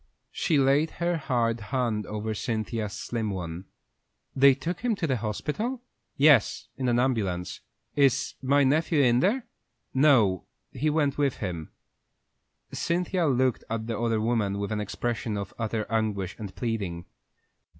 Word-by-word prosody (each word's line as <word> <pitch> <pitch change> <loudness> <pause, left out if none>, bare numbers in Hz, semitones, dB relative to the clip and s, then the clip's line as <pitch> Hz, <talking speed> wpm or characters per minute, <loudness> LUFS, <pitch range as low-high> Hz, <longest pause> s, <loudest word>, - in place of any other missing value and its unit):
She 160 - +1
laid 140 +3 +3
her 175 0 0
hard 120 -6 0
hand 110 0 -1
over 110 +1 -3
Cynthia's 110 -1 -3
slim 110 +1 -3
one. 90 -2 -5 0.7
"They 135 0 +6
took 165 +6 -4
him 240 -2 0
to 195 -4 -2
the 130 -5 +1
hospital?" 160 - -3 0.3
"Yes, 140 -6 +4
in 130 -1 -2
the 120 0 +3
ambulance." 100 -9 -1 0.4
"Is 140 -1 +3
my 140 +2 +3
nephew 155 +3 +2
in 120 -1 +4
there?" 225 - +1 0.5
"No; 125 - +4 0.3
he 155 +4 0
went 145 -2 +1
with 140 -3 +1
him." 85 -6 -4 1.0
Cynthia 175 0 0
looked 130 -2 +1
at 110 0 -2
the 115 -2 -3
other 115 -2 +1
woman 110 -3 0
with 100 +1 -3
an 105 -1 -1
expression 110 +1 -3
of 100 -1 -5
utter 110 -1 -1
anguish 105 -4 -1
and 100 -3 -7
pleading. 100 -8 -3
120 Hz, 145 wpm, -27 LUFS, 105-140 Hz, 1.0 s, They